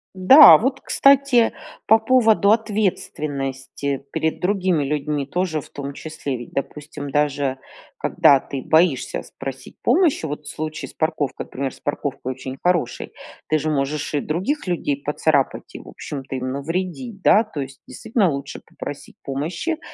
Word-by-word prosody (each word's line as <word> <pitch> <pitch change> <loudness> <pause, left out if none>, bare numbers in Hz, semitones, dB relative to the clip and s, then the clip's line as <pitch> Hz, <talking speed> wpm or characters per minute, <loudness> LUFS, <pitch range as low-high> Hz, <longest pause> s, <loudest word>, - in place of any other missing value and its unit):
Да, 265 +11 +9
вот 265 +4 -1
кстати 275 -4 +4 0.3
по 220 +1 +6
поводу 220 -3 +4
ответственности 140 - -2
перед 160 0 -1
другими 185 -5 +1
людьми 145 -1 -2
тоже, 175 -1 -1
в - - -14
том 140 0 -6
числе. 145 -3 -5
Ведь 120 - -10
допустим 145 0 -5
даже 140 -2 0 0.4
когда 140 - +4
ты 135 0 -7
боишься 160 -5 +2
спросить - - -9
помощи, 325 - +2
вот 150 +1 -5
в - - -6
случае 155 -3 -5
с - - -17
парковкой, 150 -4 -2
например, 135 0 -4
с - - -19
парковкой 140 -3 -3
очень 130 +1 -8
хороший, 175 -8 0 0.4
ты 155 - +2
же 155 +2 -2
можешь 145 +1 -2
и 145 - +2
других 190 - -2
людей 145 -5 -1
поцарапать, 145 -1 0
и - - -7
в - - -13
общем-то 135 -2 -7
им 130 0 -3
навредить, 185 - -4
да. 215 - +6
То 210 -10 -7
есть 135 0 -9
действительно, 195 - 0
лучше 140 0 -6
попросить - - -9
помощи, 165 - -3
150 Hz, 150 wpm, -21 LUFS, 140-190 Hz, 0.4 s, Да